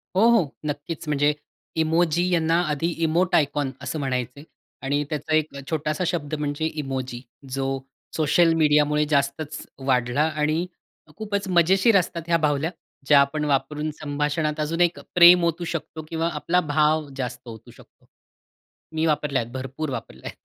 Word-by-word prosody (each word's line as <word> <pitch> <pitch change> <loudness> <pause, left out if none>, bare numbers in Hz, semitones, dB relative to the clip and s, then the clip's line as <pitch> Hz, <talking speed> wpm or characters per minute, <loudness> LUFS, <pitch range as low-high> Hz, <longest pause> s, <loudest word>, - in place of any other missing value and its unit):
हो, 190 - +3
हो. 225 -11 +3 0.2
नक्कीच. 150 +2 -5
म्हणजे 145 0 +2 0.5
इमोजी 170 +2 +2
यांना 165 0 +2
आधी 150 +2 0 0.2
इमोट 170 +3 +2
आयकॉन 145 -2 +1
असं 140 +3 -4
म्हणायचे. 130 0 -3 0.4
आणि 145 +2 0
त्याचा 150 0 -3
एक 155 -2 0
अ, - - -6
छोटासा 155 +1 -1
शब्द 160 -4 -3
म्हणजे 150 +1 -2 0.2
इमोजी, 130 -3 -4 0.3
जो 135 0 -1 0.5
सोशल 165 +2 +3
मीडियामुळे 150 -1 +3
जास्तच 140 +1 -1 0.3
वाढला 125 +1 +2
आणि 155 +2 0 0.5
खूपच 205 -2 -3
मजेशीर 190 +4 +4
असतात 170 -1 -4
ह्या 170 0 +3
बावल्या, 150 +1 0 0.4
ज्या 145 -1 +7
आपण 150 +2 -1
वापरून 150 +2 -1
संभाषणात 150 +1 -1
अजून 160 +3 -1
एक 175 0 +2 0.2
प्रेम 175 0 +8
ओतू 170 +1 -1
शकतो 165 -1 -5
किंवा 165 0 -1
आपला 165 +4 +1
भाव 155 0 +2
जास्त 125 -1 -5
ओतू 115 +1 -11
शकतो. - - -20 0.9
मी 160 0 +1
वापरल्या 150 -4 +1
आहेत, 115 0 -8
भरपूर 135 +4 -4
वापरल्या 110 - -7
आहेत. - - -14
150 Hz, 150 wpm, -24 LUFS, 140-165 Hz, 0.9 s, प्रेम